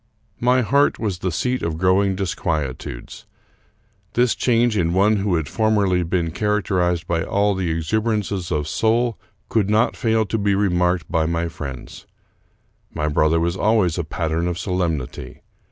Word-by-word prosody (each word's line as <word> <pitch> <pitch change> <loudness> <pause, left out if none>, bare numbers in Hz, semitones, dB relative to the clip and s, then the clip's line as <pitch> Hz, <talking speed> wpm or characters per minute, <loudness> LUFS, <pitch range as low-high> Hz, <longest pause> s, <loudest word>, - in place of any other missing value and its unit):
My 125 +1 +3
heart 140 +5 +2
was 100 -5 -3
the 90 - -2
seat 125 +10 -1
of 80 -1 -2
growing 95 +2 +2
disquietudes. 80 -9 -4 0.9
This 120 -1 +3
change 120 -2 +2
in 85 -4 +1
one 105 +3 +3
who 100 -2 0
had 80 -3 -1
formerly 105 -5 +1
been 85 -1 -1
characterized 95 -3 0
by 85 -1 -1
all 100 +4 +1
the 95 -3 -2
exuberances 100 +2 -1
of 75 -2 -1
soul 115 +5 +1 0.3
could 105 -3 +1
not 110 +2 +2
fail 110 -1 +1
to 110 +3 -2
be 100 -1 +1
remarked 90 -3 +1
by 80 -2 +1
my 85 0 -1
friends. 70 -5 -8 0.8
My 75 - -2
brother 80 +2 +2
was 85 +1 0
always 100 -5 +2
a - - 0
pattern 80 +1 -2
of 90 -1 -2
solemnity. 90 -8 -3
95 Hz, 155 wpm, -21 LUFS, 85-105 Hz, 0.9 s, My